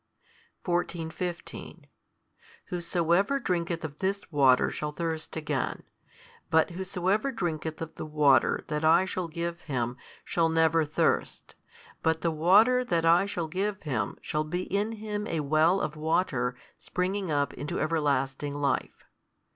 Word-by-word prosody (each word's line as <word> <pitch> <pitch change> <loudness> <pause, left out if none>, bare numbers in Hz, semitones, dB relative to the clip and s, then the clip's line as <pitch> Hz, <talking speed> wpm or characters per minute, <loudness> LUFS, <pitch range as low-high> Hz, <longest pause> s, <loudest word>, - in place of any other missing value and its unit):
14, 175 -2 -1
15 175 +1 -6 0.8
Whosoever 175 +7 +1
drinketh 170 -8 -2
of 150 -1 -8
this 195 -1 -2
water 135 -4 +4
shall 150 0 -3
thirst 160 0 -4
again, 150 -4 -2 0.7
but 160 +2 +3
whosoever 190 +6 -1
drinketh 160 -8 -3
of 160 0 -8
the - - -6
water 150 -3 +3
that 150 0 -2
I 165 +4 +5
shall 185 -2 -3
give 170 +1 -4
him 125 -4 -2 0.3
shall 165 -1 +1
never 160 0 +3
thirst; 150 - -1 0.5
but 160 0 +1
the 165 - +1
water 205 +11 +5
that 170 -8 0
I 170 +4 +5
shall 175 -5 -3
give 195 +4 -2
him 125 -9 -2
shall 150 0 -1
be 175 +4 -3
in 205 +4 -1
him 210 -1 -4
a 160 - -1
well 155 +6 +3
of 155 -2 -3
water 150 -6 0 0.2
springing 190 +1 -2
up 145 -2 0
into 145 - -4
everlasting 145 -3 0
life. 140 -2 -1
165 Hz, 140 wpm, -28 LUFS, 150-180 Hz, 0.8 s, I